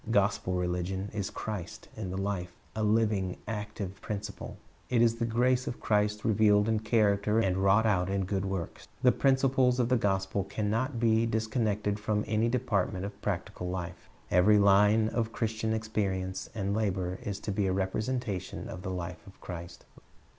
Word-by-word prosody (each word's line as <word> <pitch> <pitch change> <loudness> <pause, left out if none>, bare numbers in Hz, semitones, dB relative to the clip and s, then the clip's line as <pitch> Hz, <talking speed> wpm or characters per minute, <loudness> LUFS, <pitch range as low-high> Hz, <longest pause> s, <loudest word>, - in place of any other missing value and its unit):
Gospel 100 -3 +2
religion 90 +2 -2
is 100 -1 -2
Christ 105 -3 -6
in 105 -4 -5
the 95 - -4
life, 95 -2 -2 0.2
— - - -33
a 110 - -2
living, 105 -3 +1
active 105 -3 -5
principle. 105 0 -6 0.3
It 125 - +2
is 115 0 +4
the 115 -1 -1
grace 125 +2 +2
of 120 - -4
Christ 105 0 +1
revealed 105 -1 +4
in 110 -1 +2
character 105 -1 +2
and 95 -5 +2
wTought 100 +3 +4
out 95 -4 +2
in 100 -1 0
good 95 0 -1
works. 95 -3 -4 0.2
The 125 - +7
principles 130 -2 +3
of 120 -1 +2
the 125 - +4
gospel 95 -2 0
can 105 +1 -2
not 120 +2 -1
be 115 0 +3
disconnected 110 -2 0
from 105 0 0
any 110 +2 +1
department 105 -6 0
of 100 0 -8
practical 90 -2 -3
life. 90 -1 -6 0.2
Every 90 +4 +5
line 105 +2 +5
of 115 -1 -1
Christian 110 -1 -1
experience 100 -4 -2
and 100 -2 -1
labor 95 -4 -1
is 100 -1 -4
to 105 - -3
be 100 0 0
a - - +1
representation 100 +2 -2
of 90 - -7
the 95 - -5
life 90 -1 -5
of 95 - -15
Christ. 85 -1 -8
105 Hz, 175 wpm, -30 LUFS, 95-110 Hz, 0.3 s, The